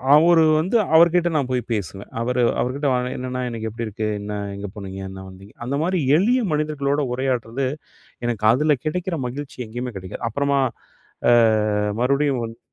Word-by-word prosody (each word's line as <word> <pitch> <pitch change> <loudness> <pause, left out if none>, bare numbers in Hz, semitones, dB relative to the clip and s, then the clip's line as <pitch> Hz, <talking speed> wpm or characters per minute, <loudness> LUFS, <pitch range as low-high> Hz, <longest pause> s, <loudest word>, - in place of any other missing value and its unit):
அவரு 165 +2 +6 0.2
வந்து 185 +8 -1 0.2
அவர்கிட்ட 170 +1 +5
நான் 135 -4 0
போய் 125 -1 0
பேசுவேன். 100 -1 -5
அவரு 125 +1 0 0.2
அவர்கிட்ட 140 +4 -1 0.3
என்னண்ணா 125 0 -4
இன்னைக்கு 110 -1 -4
எப்டி 115 +2 -5
இருக்கு? 110 +1 -3
என்ன? 105 +1 -5 0.2
எங்கே 100 +1 -6
போனீங்க? 95 -2 -7
என்ன 95 0 -9
வந்தீங்க? 95 +3 -14
அந்தமாரி 160 +8 0 0.2
எளிய 240 +8 +3
மனிதர்களோட 150 -1 0
உரையாட்றது. 130 0 -1 0.6
எனக்கு 115 -3 -2
அதில 150 +5 +3
கிடைக்கிற 180 +3 -2
மகிழ்ச்சி, 140 +3 -7
எங்கேயுமே 120 +2 -5
கெடைக்காது. 95 -1 -8
அப்புறமா 140 +3 +1 0.7
அ - - +6 0.7
மறுபடியும் 140 +1 +2
வந் 115 0 -8
130 Hz, 145 wpm, -22 LUFS, 115-150 Hz, 0.7 s, அவரு